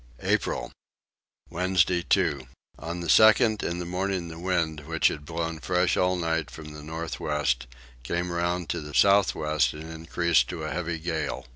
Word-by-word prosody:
April. - - 0 0.8
Wednesday 90 0 +2
2. 70 -5 +1 0.3
On 85 +2 -5
the 85 - -5
2nd 110 +2 +5
in 85 - -2
the 90 - -4
morning 90 0 -2
the 80 0 -9
wind, 85 -4 0
which 80 -1 +3
had 75 -1 -7
blown 85 -1 -3
fresh 90 +2 +1
all 90 0 +2
night 80 -3 -1
from 75 -1 -10
the 75 - -9
north 80 +2 -5
west, 75 -5 0 0.3
came 85 +8 -2
round 85 0 -1
to - - -2
the 75 -1 -8
south 100 0 +5
west 75 -5 +1
and 80 +2 -8
increased 85 +1 +1
to 85 -3 -5
a 75 - -3
heavy 85 -1 -2
gale. 80 -2 -3
85 Hz, 170 wpm, -26 LUFS, 80-90 Hz, 0.8 s, 2nd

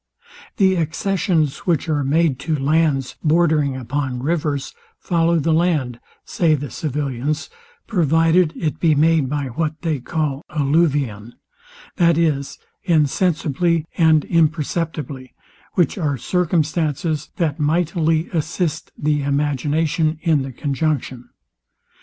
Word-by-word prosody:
The 190 -4 +3
accessions, 165 -2 0
which 170 -1 +1
are 150 -3 0
made 145 -1 +1
to 160 +1 -1
lands 145 -2 +1
bordering 155 -4 +2
upon 130 0 -3
rivers, 145 -3 -1 0.2
follow 170 -1 +1
the 160 +1 +1
land, 155 -8 0 0.3
say 165 -3 +2
the 145 0 -6
civilians, 145 - -3 0.3
provided 165 -2 +3
it 155 -2 -3
be 160 -3 +3
made 155 -2 +3
by 145 -2 -2
what 155 +4 -3
they 160 -4 0
call 150 +1 -2
alluvion, 140 -7 0 0.6
that 170 -3 +4
is, 150 -5 0 0.3
Insensibly 165 -1 +1
and 160 -3 +4
Imperceptibly; 155 -4 -1 0.4
which 175 +2 +1
are 145 -5 0
circumstances 160 -1 -1
that 160 -4 -1
mightily 160 +1 +1
assist 160 0 -2
the 150 0 0
imagination 150 +3 0
in 160 -5 +2
the 135 0 -5
conjunction. 135 -2 -2
155 Hz, 110 wpm, -20 LUFS, 140-165 Hz, 0.6 s, that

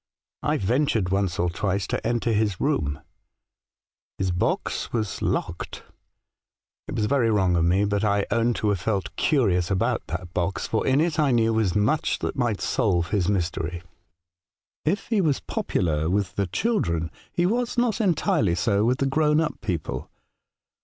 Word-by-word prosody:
I - - +1
ventured 115 -2 +1
once 95 -2 0
or 85 - +1
twice 95 +1 -1
to - - -2
enter 120 -1 0
his 105 -3 0
room. 75 - 0 1.2
His 95 -2 0
box 90 - -1
was 110 -3 0
A - - -6
Strange - - -13
Letter, - - +1
49 - - -17
locked. - - -8 1.0
It - - -5
was 105 - +1
very 125 -1 +2
wrong 95 -5 +2
of 85 -1 +2
me, 95 +4 +3
but 100 0 0
I 100 -1 +2
own 120 0 +2
to 105 - 0
have 100 -3 +1
felt 100 +1 -2
curious 95 - +2
about 95 -2 0
that 90 -1 -5
box, 90 +2 -1
for 110 - -1
in 135 +2 +4
it 165 -1 0
I 150 -2 +3
knew 115 -2 +3
was 110 -6 +1
much 110 +9 +1
that - - -3
might 120 -6 0
solve 85 -6 +1
his 100 -3 +1
mystery. 85 -3 -2 0.5
*' 95 +4 -70 0.2
If 190 +7 0
he 220 -4 +2
was 150 -6 +1
popular 80 -2 -1
with 95 -1 0
the 100 -2 0
children, 85 - 0 0.2
he 175 - +1
was 240 +5 0
not 240 -2 +1
entirely 140 - +2
so 100 +5 +1
with 125 +3 +2
the 135 - 0
grown 150 +2 +2
up 160 - -2
people. 85 -7 -3
105 Hz, 180 wpm, -25 LUFS, 90-130 Hz, 1.2 s, in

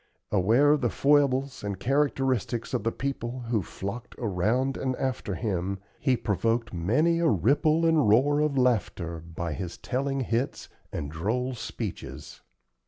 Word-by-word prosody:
Aware 115 +11 +4
of 150 -1 +3
the 120 - +2
foibles 140 -2 +2
and 100 -2 -3
characteristics 135 -2 0
of - - 0
the 115 - +1
people 130 -2 -4
who 115 -4 +2
flocked 100 +7 -6
around 115 +6 0
and 130 -1 -1
after 125 -7 -2
him, 95 0 -2 0.2
he 130 -3 +2
provoked 115 +3 0
many 130 - +2
a 170 - +3
ripple 145 - +3
and 160 -8 +4
roar 140 +7 +4
of 150 -2 +1
laughter 100 -9 0
by 85 0 -5
his 90 +1 -5
telling 135 +1 -2
hits 120 +2 -2 0.2
and 75 -3 -4
droll 115 +11 -1
speeches. 115 -3 -6
120 Hz, 145 wpm, -27 LUFS, 100-135 Hz, 0.2 s, Aware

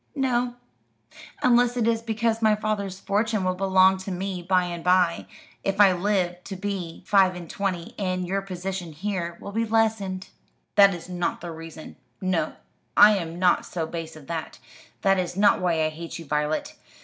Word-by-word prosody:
"No; 250 -3 0 0.9
unless 245 0 +4
it 230 -2 +1
is 230 -1 +1
because 225 0 -1
my 215 -1 +4
father's 205 -3 -3
fortune 215 +1 0
will 185 0 +1
belong 190 0 +4
to 190 +1 -7
me 185 0 -3
by 180 +1 +2
and 175 -1 -5
by, 180 -2 +2 0.4
if 195 +1 -1
I 200 -2 +8
live 180 -1 0
to 195 - -6
be 185 -4 -5
five 190 -2 +4
and 175 -1 -8
twenty, 185 -3 -3
and 185 -2 -1
your 195 +2 -1
position 185 -2 -5
here 170 0 -3
will 200 - -8
be 225 +3 0
lessened." 215 -4 0 0.4
"That 200 -2 +6
is 170 -1 -9
not 180 -1 -2
the 175 0 -6
reason; 165 -1 -10 0.2
no, 180 -4 0 0.4
I 210 0 +8
am 165 -2 -5
not 180 0 +3
so 165 -3 -3
base 165 -1 -6
as 150 - -13
that. 160 0 -5 0.5
That 195 -1 +4
its 180 -1 -3
not 205 -1 +4
why 165 -3 +1
I - - +1
hate 165 +2 -7
you, 165 - -9
Violet. 150 +1 -1
185 Hz, 180 wpm, -25 LUFS, 175-205 Hz, 0.9 s, I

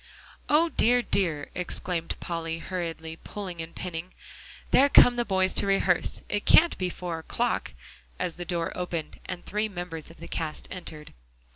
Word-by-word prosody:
"O 320 +3 +5
dear, 245 -4 +3
dear!" 165 -10 0
exclaimed 175 -1 -3
Polly, 165 -1 -3
hurriedly 165 -2 -4
pulling 185 -4 -6
and 165 0 -8
pinning, 175 0 -5 0.6
"there 280 +2 +6
come 245 -3 +8
the 240 - +1
boys 190 -3 +1
to - - +2
rehearse. 195 -3 +2
It 205 - -1
can't 340 +2 +6
be 185 -1 0
four 175 -2 -4
o'clock," 160 - -1 0.4
as 170 - -2
the 175 - -4
door 170 -1 -2
opened 170 -3 -4
and 175 - -5
three 210 +2 0
members 175 -5 -6
of 165 - -14
the 170 - -9
cast 160 -2 -3
entered. 155 -4 -7
175 Hz, 160 wpm, -27 LUFS, 165-195 Hz, 0.6 s, come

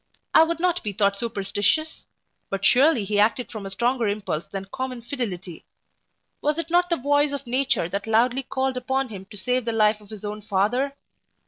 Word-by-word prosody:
I - - +8
would 330 0 -1
not 355 0 +1
be 210 -3 -3
thought 200 0 +2
superstitious; 225 +7 -1 0.4
but 195 0 -2
surely 255 -1 +5
he 205 +1 0
acted 225 +4 +2
from 210 -4 -6
a - - -5
stronger 235 +4 0
impulse 200 -6 -2
than 195 -1 -5
common 255 +3 -5
fidelity. 195 - -5 0.8
Was 300 +1 +1
it 335 0 -3
not 355 +1 +3
the 340 - +2
voice 285 +2 +2
of 280 -1 -4
nature 255 -7 +1
that 200 +4 -4
loudly 240 +4 +3
called 265 0 -2
upon 265 +1 -1
him 195 -3 -8
to 205 +1 -11
save 250 +4 0
the 230 - 0
life 215 -1 +3
of 205 - -17
his 215 -1 -9
own 210 +1 -5
father? 220 +8 0
235 Hz, 195 wpm, -24 LUFS, 205-270 Hz, 0.8 s, I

